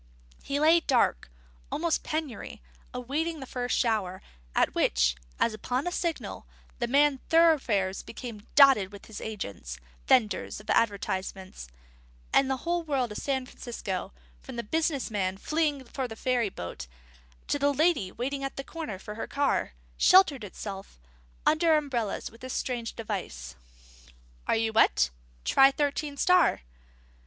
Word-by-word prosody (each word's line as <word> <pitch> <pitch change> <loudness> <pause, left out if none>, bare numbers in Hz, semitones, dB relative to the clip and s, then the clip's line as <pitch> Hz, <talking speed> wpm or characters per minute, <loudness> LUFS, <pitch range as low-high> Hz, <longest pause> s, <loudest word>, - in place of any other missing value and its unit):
He 280 +1 -2
lay 320 +3 +6
dark, 245 - +1 0.4
almost 330 0 +1
in - - -11
penury, 310 -6 -4 0.3
awaiting 295 +6 -2
the 265 - -6
first 245 -1 -2
shower, 205 -6 0 0.3
at - - +3
which, - - +2 0.2
as 230 - +2
upon 250 +5 -2
a 355 - -1
signal, 340 -2 -3 0.3
the 240 - 0
main 280 +1 +3
thoroughfares 265 - +3
became 230 -4 -9
dotted 265 -9 +7
with 200 -1 -11
his 220 - -8
agents, 100 - -6 0.3
vendors 220 -5 +2
of 210 - -4
advertisements; 190 - -1 0.7
and 270 - +4
the 265 - 0
whole 345 0 +1
world 275 -7 -1
of 210 - -5
San 265 -2 -1
Francisco, 210 -7 -5 0.3
from - - -10
the 235 - -3
businessman 220 - -1
fleeing 300 +2 0
for 260 +1 -4
the 225 - -8
ferry 245 -2 0
boat, 85 - -7 0.6
to 285 - 0
the 285 0 +3
lady 285 - +2
waiting 275 +5 -3
at 270 - -4
the 275 - -5
corner 310 - -6
for 210 +3 -8
her 225 - -5
car, 280 - 0 0.3
sheltered 340 - +6
itself 195 - -8 0.5
under 315 0 +4
umbrellas 250 -8 -2
with 230 - -17
this 255 0 -5
strange 240 -3 -3
device: 180 - -5 0.9
Are - - +3
you 225 0 0
wet? 65 - +4 0.3
Try 270 0 +6
Thirteen 285 +1 -2
Star. 360 - +4
250 Hz, 145 wpm, -28 LUFS, 205-290 Hz, 0.9 s, dotted